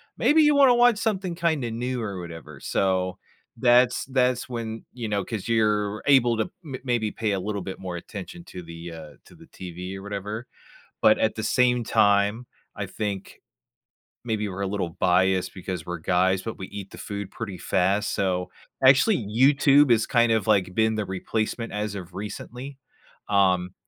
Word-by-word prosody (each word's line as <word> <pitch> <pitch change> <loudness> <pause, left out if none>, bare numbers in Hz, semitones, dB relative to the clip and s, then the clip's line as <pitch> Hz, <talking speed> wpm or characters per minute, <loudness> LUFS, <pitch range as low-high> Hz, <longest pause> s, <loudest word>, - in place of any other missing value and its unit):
maybe 310 +1 +4
you 295 0 +5
wanna 270 -3 +6
watch 240 -2 +5
something 195 -5 -1
kinda 160 -8 -1
new, 125 +2 -3
or 100 -3 -4
whatever. 80 -5 -9
So, 95 -1 0 0.4
that's 125 +1 +4
that's 125 -2 +1
when, 115 -2 -5
you 120 -3 -5
know 100 -1 -1
'cause 110 -2 -5
you're 105 -2 +1
able 120 -5 +4
to 110 - +2 0.2
m 140 -5 -6
maybe 120 -4 0
pay 110 -2 -2
a 95 - 0
little 100 +1 -3
bit 95 - -7
more 90 -2 -5
attention 110 - -9
to 90 - -9
the, 85 0 -9
uh 80 -2 -10
to - - -17
the - - -16
TV, 90 +1 -8
or 95 - -10
whatever. 105 +3 -5 0.6
But 110 - +5
at 110 - +1
the 110 - -3
same 125 -1 +2
time, 105 +2 +2 0.3
I - - -4
think 100 -3 -5 0.8
maybe 110 -3 -1
we're 95 +1 -6
a 100 - 0
little 95 -3 -2
biased 95 +1 +2
because 90 -2 -5
we're 90 - -3
guys, 95 +2 +1
but 115 - -6
we 95 - -6
eat 100 -1 -8
the - - -11
food 100 -1 -6
pretty 105 -5 -6
fast. 95 +4 0
So, 90 -2 -1 0.3
actually, 135 +11 +6
YouTube 140 +5 +4
is 115 -2 +4
kind 120 -2 +3
of, 110 -3 +1
like, 95 -4 +2
been 110 0 +2
the 105 - -1
replacement 110 +5 -3
as 105 0 -3
of 90 -3 -8
recently. 125 +7 -7 0.5
Um, 95 -2 +2
105 Hz, 180 wpm, -25 LUFS, 95-120 Hz, 0.8 s, wanna